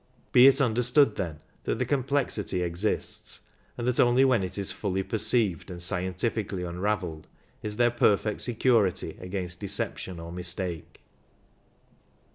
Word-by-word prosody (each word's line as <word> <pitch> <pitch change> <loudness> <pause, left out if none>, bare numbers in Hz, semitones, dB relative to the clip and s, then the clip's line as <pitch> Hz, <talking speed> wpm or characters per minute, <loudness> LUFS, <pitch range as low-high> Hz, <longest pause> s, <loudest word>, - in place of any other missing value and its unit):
Be 125 +2 +8
it 135 +1 +5
understood, 125 0 +3
then, 85 -6 -4 0.2
that - - -1
the - - 0
complexity 130 -9 -1
exists, 85 +5 -3 0.4
and 120 - -3
that 125 - +1
only 125 +2 +5
when 125 -5 +3
it 95 +1 -3
is 100 -1 +2
fully 95 -2 -2
perceived 110 -5 0
and 90 -1 -7
scientifically 95 +2 -2
unravelled 90 -2 -3 0.3
is 105 -1 -4
there 120 +1 +3
perfect 105 -2 +1
security 115 -5 +1
against 90 -1 -4
deception 95 -3 -2
or 85 0 -8
mistake. 90 -2 -2
100 Hz, 130 wpm, -27 LUFS, 90-120 Hz, 0.4 s, Be